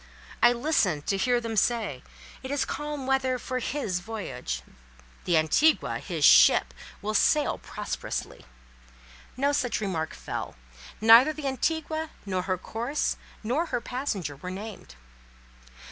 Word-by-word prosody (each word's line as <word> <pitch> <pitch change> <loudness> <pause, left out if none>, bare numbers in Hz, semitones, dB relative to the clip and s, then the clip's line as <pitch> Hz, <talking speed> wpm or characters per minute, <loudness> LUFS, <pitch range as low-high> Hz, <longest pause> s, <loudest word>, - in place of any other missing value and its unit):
I 240 - +7
listened 235 - +1
to 195 - +1
hear 245 +5 +2
them 230 -1 -4
say, 215 - 0 0.4
"It 260 - -7
is 280 -1 0
calm 295 -2 -4
weather 260 -1 +1
for 255 +1 -3
his 235 -8 -2
voyage; 190 - -5 0.6
the 175 -2 +3
Antigua" 160 - +3
(his - - -1
ship) - - +6 0.3
"will 215 +1 -2
sail 295 +7 +2
prosperously." - - -5 0.9
No 280 +2 +2
such 255 -4 0
remark 170 -7 -3
fell; - - -6 0.4
neither 230 +7 +7
the 305 -2 -7
Antigua, 315 +3 -1 0.2
nor 185 -2 -1
her 185 0 -1
course, 235 - -2 0.3
nor 275 +10 0
her - - -1
passenger 235 - -3
were 180 +6 -7
named. 195 - -8
240 Hz, 130 wpm, -27 LUFS, 190-280 Hz, 0.9 s, I